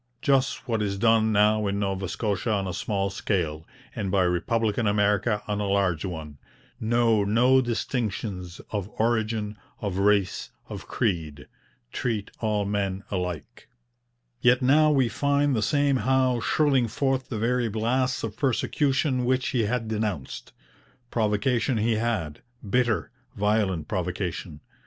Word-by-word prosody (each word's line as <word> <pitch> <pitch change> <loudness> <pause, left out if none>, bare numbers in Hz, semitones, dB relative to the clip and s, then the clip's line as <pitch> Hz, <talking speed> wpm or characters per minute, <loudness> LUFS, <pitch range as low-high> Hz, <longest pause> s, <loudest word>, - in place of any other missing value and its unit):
Just 135 -1 +1
what 115 -3 0
is 100 -1 -1
done 110 +1 +3
now 105 0 +3
in 100 0 -1
Nova 95 -2 -2
Scotia 105 +1 -2
on 100 -2 0
a 90 - -3
small 100 0 -1
scale, 80 -7 -2 0.3
and 100 - -2
by 95 0 +3
republican 105 +5 0
America 105 +1 +1
on 105 -1 -1
a 100 - -1
large 95 -5 +1
one: 80 -6 -6 0.4
know 115 -1 +2
no 125 +6 +4
distinctions 110 -7 -3
of 105 -2 -3
origin, 110 -2 0 0.2
of 100 -2 -3
race, 100 -1 +2 0.2
of - - -8
creed. 80 -10 -2 0.4
Treat 110 -5 -2
all 105 -2 0
men 100 -1 -2
alike.' 90 -5 -4 0.7
Yet 125 +1 +4
now 155 +4 +5
we 135 -4 +3
find 140 +2 +1
the 110 - 0
same 140 +4 +2
Howe 130 +1 +2
shrilling 135 -1 +2
forth 135 +3 -1
the 115 - -3
very 120 +1 +1
blasts 125 +4 0
of 110 -2 -4
persecution 135 +1 +1
which 130 +1 +1
he 120 -4 +1
had 115 +1 -1
denounced. 105 -10 -3 0.6
Provocation 115 +3 +1
he 110 +1 +1
had 105 -10 -2 0.3
bitter, 120 +1 +1 0.2
violent 100 -6 0
provocation. 90 -3 -3
110 Hz, 140 wpm, -26 LUFS, 100-120 Hz, 0.7 s, now